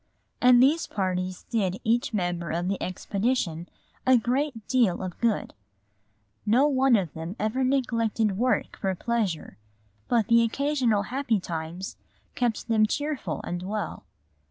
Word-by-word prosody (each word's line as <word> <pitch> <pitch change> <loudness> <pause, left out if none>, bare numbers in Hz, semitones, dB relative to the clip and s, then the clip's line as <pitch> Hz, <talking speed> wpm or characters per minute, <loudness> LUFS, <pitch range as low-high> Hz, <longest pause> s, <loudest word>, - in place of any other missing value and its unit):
And 250 0 +7
these 305 +5 +3
parties 185 -2 -2
did 195 -5 0
each 235 +2 +1
member 175 -5 -2
of 170 +2 -1
the 195 0 -2
expedition 185 -3 -1 0.3
a 255 -1 +5
great 245 -1 -1
deal 230 -9 +2
of 185 -2 -6
good. 230 -3 0 0.9
No 240 +7 +4
one 265 -3 +4
of 185 -7 -1
them 165 +4 -6
ever 220 +5 0
neglected 230 -5 +1
work 250 +5 0
for 190 -1 -1
pleasure, 210 - -2 0.5
but 235 -3 +2
the 235 +2 +5
occasional 240 -3 +1
happy 255 -6 +1
times 170 +1 -5 0.4
kept 240 -4 -1
them 220 -2 +3
cheerful 285 - -2
and 175 0 -4
well. 205 +3 -4
220 Hz, 135 wpm, -26 LUFS, 185-250 Hz, 0.9 s, And